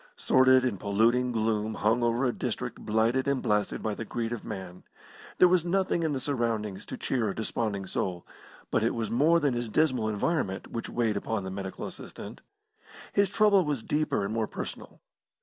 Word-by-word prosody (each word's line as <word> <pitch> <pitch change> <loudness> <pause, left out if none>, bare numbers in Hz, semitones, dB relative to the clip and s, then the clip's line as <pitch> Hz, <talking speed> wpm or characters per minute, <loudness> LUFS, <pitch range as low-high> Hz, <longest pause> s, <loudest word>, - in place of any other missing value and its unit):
Sordid 130 0 +5
and 105 -7 -1
polluting 115 +5 +2
gloom 110 -1 0
hung 115 +3 +2
over 120 +2 +1
a 125 - +1
district - - -4
blighted 115 +5 +1
and 140 -1 +1
blasted 105 -3 0
by 110 - -1
the 110 - -5
greed 115 +1 -3
of 120 - -6
man. 90 -1 -7 0.6
There 180 - +7
was 180 -2 +3
nothing 180 0 +1
in 160 -2 0
the 135 - -1
surroundings 115 -7 -2
to - - -6
cheer 120 -5 -1
a - - -4
desponding 110 -3 -2
soul, 90 -1 -3 0.5
but - - +2
it - - +1
was 115 -2 -2
more 155 +8 +4
than 145 -5 +1
his 120 -1 -3
dismal 130 -4 +2
environment 105 - -1
which 115 - -4
weighed 115 -4 0
upon 110 0 -2
the 95 - -5
medical 95 0 -5
assistant. - - -9 0.7
His 200 -2 +3
trouble 205 -2 +4
was 145 -7 -2
deeper 150 -9 0
and 105 - -3
more 110 -1 0
personal. - - -7
115 Hz, 185 wpm, -28 LUFS, 105-135 Hz, 0.7 s, There